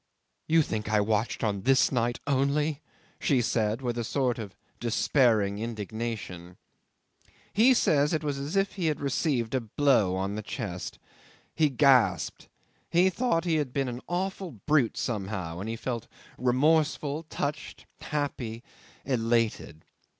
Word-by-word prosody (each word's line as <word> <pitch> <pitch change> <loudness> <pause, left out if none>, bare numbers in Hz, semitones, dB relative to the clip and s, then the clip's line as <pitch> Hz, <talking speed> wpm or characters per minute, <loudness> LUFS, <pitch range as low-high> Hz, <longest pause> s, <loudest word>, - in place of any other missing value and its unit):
"You 165 0 +4
think 105 -5 -3
I 105 0 +3
watched 110 +3 0
on 100 -3 0
this 135 +5 +4
night 120 -2 0
only!" 145 +2 +1 0.4
she 135 -4 +2
said, 110 +1 0
with 120 -1 -1
a - - -1
sort 125 0 0
of 100 -4 -7 0.2
despairing 115 -4 +2
indignation. 110 -5 -5 1.0
'He 245 +5 +5
says 150 -9 +3
it 160 -2 0
was 145 -2 -2
as 145 +6 -4
if 195 0 +2
he 180 -5 -2
had 155 - 0
received 135 -4 0
a 130 - +1
blow 115 -5 +2
on 95 +1 -2
the 110 - -3
chest. 100 -5 -5 0.6
He 155 -2 +3
gasped. 135 -2 +3 0.4
He 180 +2 +4
thought 185 -4 0
he 165 -2 +2
had 145 -4 -1
been 135 -2 0
an 120 +1 -6
awful 185 0 -3
brute 145 -7 +2
somehow, 95 -7 -3
and 105 +4 -4
he 115 - -2
felt 120 0 -4 0.3
remorseful, 150 +3 +2
touched, 145 +1 -4
happy, 130 -6 -3 0.4
elated. 115 - 0
125 Hz, 145 wpm, -28 LUFS, 110-150 Hz, 1.0 s, He